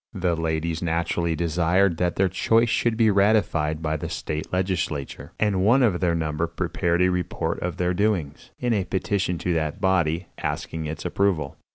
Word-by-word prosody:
The 90 -3 0
ladies 80 0 -2
naturally 85 0 0
desired 85 +2 +2
that 90 0 0
their 95 - +3
choice 115 +5 +2
should 115 0 +1
be 110 -2 +4
ratified 100 -7 +2
by 80 0 0
the - - -5
state 75 0 -4
legislature, 90 -6 -2
and 100 -3 +1
one 125 +6 +5
of 100 -7 +2
their 85 -2 +1
number 80 0 -1
prepared 85 +1 0
a 90 - +3
report 85 -2 -2
of 90 -2 -3
their 90 0 +1
doings, 90 -7 -1
in 120 -1 0
a 100 -4 0
petition 95 -1 -1
to 90 +1 -1
that 80 +2 -2
body, 90 -3 +1
asking 80 -1 -3
its 75 0 -6
approval. 90 -9 0
90 Hz, 175 wpm, -24 LUFS, 80-95 Hz, -, one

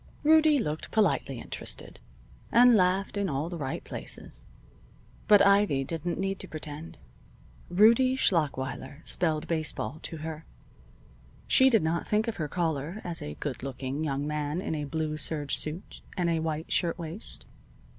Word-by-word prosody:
Rudie 310 0 +6
looked 155 - -2
politely 175 - +1
interested, - - -7 0.5
and 245 +1 +7
laughed 190 +1 +2
in 200 -2 0
all 145 +3 -2
the 175 - -5
right 135 -2 -3
places. - - -8 0.8
But 205 -1 +7
Ivy 200 -9 +4
didn't 165 +4 -3
need 195 0 -2
to - - -5
pretend. 155 +1 -8 0.7
Rudie 230 +7 +5
Schlachweiler 145 - 0
spelled 160 -2 +1
baseball 155 -1 -1
to 165 - -7
her. 160 -1 -5 1.0
She 265 0 +6
did 225 -7 +3
not 160 +1 -1
think 215 +2 +1
of 230 - -3
her 155 - -2
caller 165 +3 -2
as 175 -2 -1
a 75 0 -6
good 140 - -5
looking 135 +2 -4
young 140 -2 -1
man 150 +1 -2
in 185 - -3
a 150 -2 -2
blue 155 +1 -2
serge 150 -1 -1
suit 155 +5 -3 0.2
and 175 -2 +1
a 165 - +1
white 160 0 -3
shirtwaist. 170 +2 -2
160 Hz, 150 wpm, -28 LUFS, 150-195 Hz, 1.0 s, and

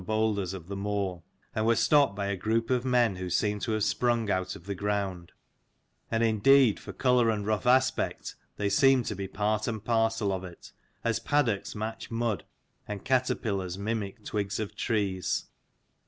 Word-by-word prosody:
boulders 110 -3 0
of 85 -3 -9
the 100 - -5
moor, 100 -3 -2 0.3
and 110 - 0
were 115 - +4
stopped 140 -4 +4
by 100 0 -2
a 100 0 -1
group 115 +5 -1
of 125 -1 +2
[men 120 -6 +2
who 90 0 -4
seemed 105 +3 0
to 115 - -1
have 110 -1 0
sprung 115 -1 +1
out 95 0 -1
of 85 - -13
the 100 - -3
ground; 100 -3 -2 0.8
and 115 0 +1
indeed 115 +2 +5
for 100 - -8
colour 125 +3 +3
and 105 -2 -1
rough 110 +2 -1
aspect 130 +1 +2 0.2
they 105 - 0
seemed 130 +5 +4
to 105 - -3
be 100 0 -4
part 105 +3 -1
and 110 -2 -4
parcel 115 -3 +1
of 95 -1 -3
it, 90 -2 -11 0.3
as 115 -1 +1
paddocks 125 -9 0
match 110 +1 -5
mud 115 -6 -1 0.4
and 105 -2 -6
caterpillars 100 -8 0
mimic 105 +1 -4
twigs 100 -1 -2
of 110 -2 -4
trees. 100 -6 -1
105 Hz, 175 wpm, -28 LUFS, 100-115 Hz, 0.8 s, indeed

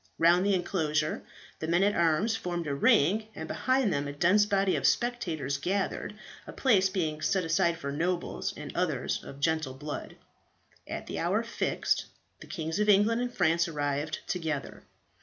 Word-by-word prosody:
Round 175 +2 +5
the 200 0 +3
enclosure 155 -4 -1 0.4
the 160 - -3
men 175 +3 +3
at 205 +1 +3
arms 170 +7 +2
formed 175 -5 -3
the 145 - -2
ring, 180 +9 +3
and 160 - -6
behind 255 -2 +1
them 140 0 -1
a - - -4
dense 185 +8 +3
body 195 -2 +2
of - - +2
spectators 165 - -1
gathered, 195 +5 -2 0.3
a - - -6
place 200 -8 +3
being 160 -5 -2
set 190 +2 +1
aside 165 +1 +2
for 140 -4 -4
nobles, 175 +4 -2
and - - -8
others - - -1
of 140 - -10
gentle 155 -3 0
blood. 145 +2 -6 0.7
At - - -5
the - - -5
hour - - +1
fixed - - -1 0.3
the - - -12
Kings 160 +3 -3
of 210 0 +2
England 210 +4 +4
and 245 0 -2
France 170 -5 +2
arrived 145 -1 -2
together. 160 -5 -3
170 Hz, 170 wpm, -29 LUFS, 155-200 Hz, 0.7 s, Round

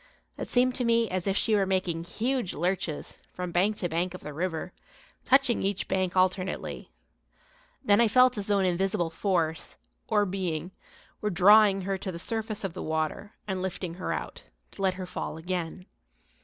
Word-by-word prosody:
It - - -6
seemed 255 +1 +3
to 255 - 0
me 230 -1 +3
as 185 0 -2
if 195 0 +1
she 220 - +1
were 195 -2 +2
making 180 -3 0
huge 240 +2 -1
lurches, 175 -2 -2 0.2
from 180 -1 -4
bank 195 +5 +2
to 175 - -1
bank 175 +2 -1
of - - -9
the 150 - -7
river, 175 +2 -3 0.5
touching 265 -2 +4
each 195 -1 -1
bank 185 -1 0
alternately. 185 0 0 1.0
Then 205 -1 +5
I 235 - +5
felt 255 +3 +5
as 205 -2 -3
though 205 -1 +3
an 195 - +2
invisible 180 -2 0
force, 165 -3 -1 0.3
or 205 - +3
being, 180 -3 -3 0.5
were 210 - 0
drawing 200 +1 +6
her 190 0 -2
to 190 - -4
the 170 - -6
surface 220 +3 -3
of 195 -4 -3
the - - -6
water 160 +6 -2
and 190 -2 -2
lifting 185 -2 -3
her - - -2
out, - - -5 0.3
to - - -10
let 190 -1 +2
her 185 0 -5
fall 175 - -5
again. 180 +1 -4
190 Hz, 185 wpm, -28 LUFS, 175-205 Hz, 1.0 s, drawing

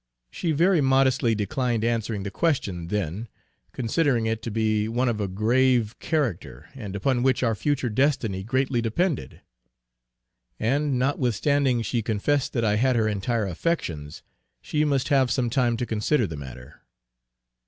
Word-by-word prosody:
She 170 - -2
very 170 +2 +3
modestly 130 -3 +3
declined 120 +1 -1
answering 115 -3 -1
the 100 - -5
question 100 - -1
then, 105 +3 -3 0.4
considering 125 0 0
it 110 0 -1
to - - -5
be 110 -1 0
one 120 +3 0
of 110 -3 -1
a 100 - -1
grave 115 +3 +2
character, 135 - -2
and 105 -8 -7
upon 120 +5 0
which 130 0 +2
our 115 -2 +2
future 135 +3 -1
destiny 115 -5 0
greatly 130 +2 0
depended. 120 - -2 1.2
And 140 +3 +1
notwithstanding 130 0 +1
she 120 0 -1
confessed 120 +6 0
that 115 -3 0
I 105 -1 +2
had 130 +2 +2
her 110 -2 +2
entire 110 +2 -1
affections, 85 - -3 0.4
she 150 - -1
must 140 -2 0
have 135 -3 +3
some 120 -3 0
time 120 -2 +1
to 125 - -2
consider 115 +4 +1
the 80 - -6
matter. 65 -3 -10
120 Hz, 150 wpm, -25 LUFS, 105-135 Hz, 1.2 s, very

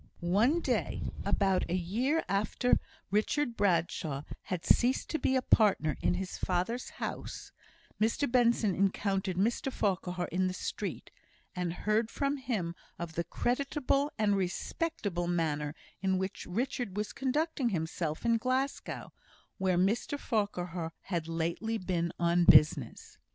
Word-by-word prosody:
One 225 - +3
day, - - -1
about 195 -2 +1
a 175 - +1
year 235 - 0
after 205 +5 +2 0.3
Richard 235 +5 +1
Bradshaw 165 -7 0 0.2
had 180 -2 -3
ceased 250 +2 +3
to 315 - 0
be 260 - +2
a 260 - +2
partner 200 -11 +3
in - - +2
his 185 +1 -4
father's 185 +7 -1
house, - - -5 0.5
Mr 225 +6 +2
Benson 235 -5 +3
encountered 195 -1 0
Mr 235 +7 +1
Farquhar 180 -5 -1
in 185 +1 +1
the 185 - -3
street, - - -4 0.4
and 180 -2 -1
heard 215 +5 0
from 280 +3 -1
him 220 -11 -2 0.2
of 170 -1 -5
the 170 - -1
creditable 275 - 0
and 210 -2 +3
respectable 195 - -2
manner 155 -4 -1 0.3
in 190 -1 +2
which 190 +2 -4
Richard 225 0 -2
was 210 0 -2
conducting 275 0 0
himself 160 -1 -2
in 230 0 +4
Glasgow, 260 +4 -2 0.5
where 185 -2 +2
Mr 210 +9 +1
Farquhar 180 - -2 0.2
had 165 -2 -1
lately 170 +7 -1
been 175 -3 -1
on 170 0 +3
business. 150 - +4
195 Hz, 135 wpm, -31 LUFS, 175-240 Hz, 0.5 s, in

